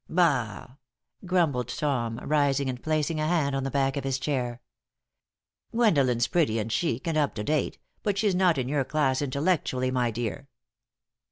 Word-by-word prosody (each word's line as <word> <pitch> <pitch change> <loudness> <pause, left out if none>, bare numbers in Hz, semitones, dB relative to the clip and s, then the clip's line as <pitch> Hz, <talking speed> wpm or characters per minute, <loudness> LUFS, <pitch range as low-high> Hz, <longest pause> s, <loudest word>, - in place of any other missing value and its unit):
"Bah!" 135 - 0 0.5
grumbled 160 -10 +1
Tom, 120 -5 -1
rising 140 -2 +2
and 125 -1 -8
placing 155 0 0
a 155 - 0
hand 155 -5 +1
on 135 - -1
the 135 - -2
back 135 0 +1
of 140 - -3
his 135 -1 0
chair, 130 -4 -2 1.1
"Gwendolen's 140 - +3
pretty 155 -11 +1
and 110 0 -2
chic 130 0 -1
and 165 - 0
up 145 - 0
to 105 - -3
date, 150 +3 0 0.2
but 205 -2 -1
she's 205 -1 +2
not 180 -4 +3
in 130 -2 -1
your 140 0 +1
class 135 -1 +1
intellectually, 140 -2 0
my 125 -2 +1
dear." 120 +4 -4
140 Hz, 165 wpm, -27 LUFS, 125-155 Hz, 1.1 s, Gwendolen's